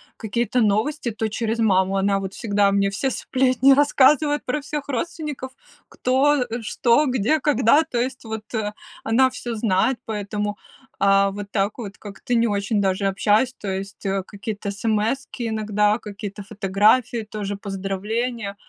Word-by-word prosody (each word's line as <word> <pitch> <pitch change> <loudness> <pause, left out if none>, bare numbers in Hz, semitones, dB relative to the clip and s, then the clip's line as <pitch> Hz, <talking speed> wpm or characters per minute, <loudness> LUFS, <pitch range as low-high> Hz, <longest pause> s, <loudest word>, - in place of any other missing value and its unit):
какие-то 235 +3 -1
новости, 225 +5 +1
то 220 +1 -2
через 225 +1 -2
маму, 195 -2 +2
она 195 0 +2
вот 190 0 -5
всегда 205 -2 +1
мне 200 0 +2
всё 230 +7 -1
сплетни 260 +2 +3
рассказывают 290 +1 +3
про 285 +4 -1
всех 290 0 -5
родственников: 290 -1 -4 0.4
кто, 270 +3 +2
э, 235 0 -5
что, 235 +6 +2
где, 260 +4 +1
когда. 285 +1 +4
То 280 -6 -5
есть 255 +1 -3
вот 220 -1 -5 0.6
она 260 +4 +3
всё 240 -2 -5
знает, 215 +3 +1
поэтому, 210 -1 -3 0.5
э, 195 0 +4
вот 200 0 -7
так 200 0 0
вот 205 -5 -7
как-то 205 +4 -6
не 235 0 +3
очень 205 +1 0
даже 195 0 +1
общаюсь, 210 +5 +2
то 205 - -7
есть 195 +1 -5 0.2
какие-то 205 0 -5
эсэмэски 225 +4 -1
иногда, 210 -1 +1
какие-то 205 -1 -7
фотографии, 215 +5 +2
тоже 205 -1 -4
поздравления. 200 +3 -3
220 Hz, 145 wpm, -22 LUFS, 200-255 Hz, 0.6 s, когда